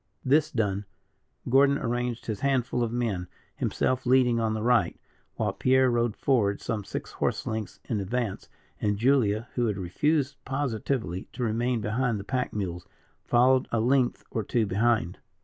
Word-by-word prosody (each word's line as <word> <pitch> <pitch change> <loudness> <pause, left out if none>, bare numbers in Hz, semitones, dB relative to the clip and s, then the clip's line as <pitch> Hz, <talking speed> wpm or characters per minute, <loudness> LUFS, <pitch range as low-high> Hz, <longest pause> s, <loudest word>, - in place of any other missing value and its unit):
This 150 +4 +4
done, 105 -6 -1 0.6
Gordon 140 +2 +5
arranged 120 -2 -2
his 110 -3 -3
handful 130 -3 0
of 115 -2 0
men, 110 -7 -2 0.3
himself 130 0 0
leading 125 -2 +4
on 110 -1 0
the 110 - -3
right, 120 -1 +2 0.4
while - - -1
Pierre 130 0 +3
rode 120 -2 +1
forward 105 -7 +1
some 110 -3 -3
six - - -6
horse - - -1
lengths 110 -3 -4
in 110 - -1
advance, 110 +1 -3 0.3
and 105 -1 +1
Julia, 115 -2 +2
who 120 -2 +1
had 105 -3 -1
refused 140 - 0
positively 125 -8 -2
to 125 - -4
remain 120 +1 0
behind 115 +1 0
the - - -6
pack 125 +3 -2
mules, 90 -4 -4 0.4
followed 125 +2 +4
a 115 - +1
length 125 +2 +2
or 110 - -1
two 115 +2 +1
behind. 105 -2 +1
120 Hz, 160 wpm, -27 LUFS, 105-130 Hz, 0.6 s, Gordon